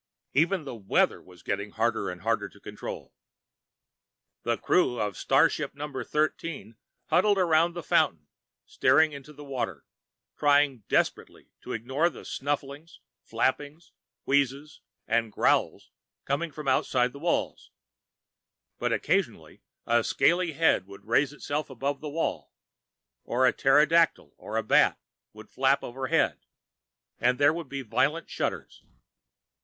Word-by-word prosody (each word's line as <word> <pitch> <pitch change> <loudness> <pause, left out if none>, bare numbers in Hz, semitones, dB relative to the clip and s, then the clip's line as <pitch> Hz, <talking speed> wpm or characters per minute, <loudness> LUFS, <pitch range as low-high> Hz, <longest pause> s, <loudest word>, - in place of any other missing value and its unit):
Even 170 +4 +2
the 135 - -7
"weather" 100 -4 +1
was 90 -2 -18
getting 100 +1 -3
harder 115 +1 -1
and 90 -1 -7
harder - - -1
to - - -19
control. - - -8 1.3
The - - -1
crew 120 - +1
of 105 -3 -2
starship - - +1
Number 145 -2 -5
Thirteen 150 -6 -2 0.4
huddled 205 -1 +4
around 170 -2 +3
the 175 -1 -6
fountain, 80 - +1 0.4
staring 160 0 +3
into 140 +1 -10
the 145 0 -12
water, 120 - -4 0.5
trying 145 -6 +2
desperately - - -1
to - - -6
ignore 135 +9 0
the - - -12
snufflings, 145 +3 -4 0.2
flappings, 145 +7 -2 0.3
wheezes 140 +2 0 0.3
and 115 -1 +1
growls - - +1 0.3
coming 150 +4 -1
from 150 -1 -8
outside 125 -1 +1
the 140 - -10
walls. 170 +3 -2 1.1
But - - -1
occasionally, - - -1 0.2
a 120 0 +2
scaly 175 +5 +2
head 145 - +2
would 100 0 -13
raise 130 +5 +2
itself 150 +1 -4
above 135 +2 -3
the 155 - -5
wall, 160 +3 -3 0.7
or 130 +2 +1
a 125 - +4
pterodactyl 150 - +3
or 110 +1 -3
bat 105 - +4 0.3
would - - -14
flap 135 +1 +2
overhead, 130 +1 0 0.8
and 125 +1 +2
there 145 +1 +4
would 165 -4 -6
be 140 -1 -5
violent 135 +8 0
shudders. - - -4
140 Hz, 130 wpm, -27 LUFS, 120-155 Hz, 1.3 s, huddled